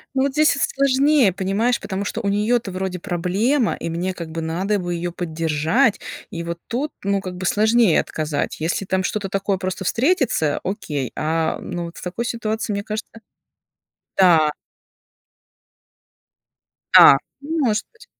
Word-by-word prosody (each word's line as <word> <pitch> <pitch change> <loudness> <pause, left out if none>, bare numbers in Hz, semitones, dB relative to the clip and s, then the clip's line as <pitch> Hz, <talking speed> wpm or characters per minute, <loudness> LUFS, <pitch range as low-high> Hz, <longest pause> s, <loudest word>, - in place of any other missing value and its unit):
Ну, 265 - +2
вот 280 - +1
здесь 305 +2 +4
с 275 - -4
с - - +1
сложнее, 275 - +3
понимаешь, 200 +6 0
потому 195 0 -4
что - - -3
у 200 - -1
неё-то 210 +1 +1
вроде 185 -1 -3
проблема, 200 +10 0
и - - -5
мне 175 +3 -2
как 170 -3 -7
бы 165 - -4
надо 180 +6 -1
бы 175 -1 -3
её 175 +1 -3
поддержать. 165 - 0 0.3
И 170 - -5
вот 170 0 -5
тут, 275 +6 -2
ну, 200 0 +1
как 185 -1 -6
бы 185 +1 -5
сложнее 220 -1 +4
отказать. 155 0 -3
Если 170 +4 -1
там 190 0 0
что-то 200 +2 -2
такое 195 0 -1
просто 185 +1 -4
встретится, 245 - +1
окей, 150 - -3
а, 160 +1 0
ну, 175 -1 -5
вот 170 - -10
с - - -9
такой 185 +6 -4
ситуацией, 220 -2 -2
мне 200 - -3
кажется. 215 0 -5 1.1
Да. 165 -5 +5 2.4
Да, 135 - +10 0.2
может 285 -8 0
быть. 450 +2 -17
195 Hz, 160 wpm, -21 LUFS, 170-230 Hz, 2.4 s, Да